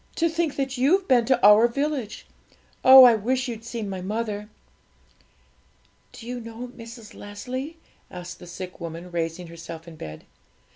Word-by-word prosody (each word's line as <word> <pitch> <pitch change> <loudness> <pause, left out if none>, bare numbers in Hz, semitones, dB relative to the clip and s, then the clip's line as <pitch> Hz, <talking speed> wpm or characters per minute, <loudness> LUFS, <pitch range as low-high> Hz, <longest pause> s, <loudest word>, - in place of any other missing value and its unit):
To 335 - +2
think 325 -2 -1
that 270 -2 -3
you've 365 +9 +3
been 245 -3 +4
to 260 0 +2
our 210 +3 +8
village! 275 -3 -3 0.6
Oh, 260 0 +11
I 245 -2 +8
wish 250 +4 -1
you'd 230 -2 -6
seen 230 -2 -5
my 190 -2 -5
mother!' 210 +1 -4 1.6
'Do 230 - -12
you 245 +1 -5
know 230 +1 -8
Mrs. 230 -2 -12
Leslie?' 255 +9 -7 0.3
asked 180 -1 -9
the 175 - -12
sick 180 +1 -8
woman, 170 +2 -7
raising 170 +1 -3
herself 165 0 -10
in 165 -2 -11
bed. 75 - -9
230 Hz, 155 wpm, -25 LUFS, 180-255 Hz, 1.6 s, Oh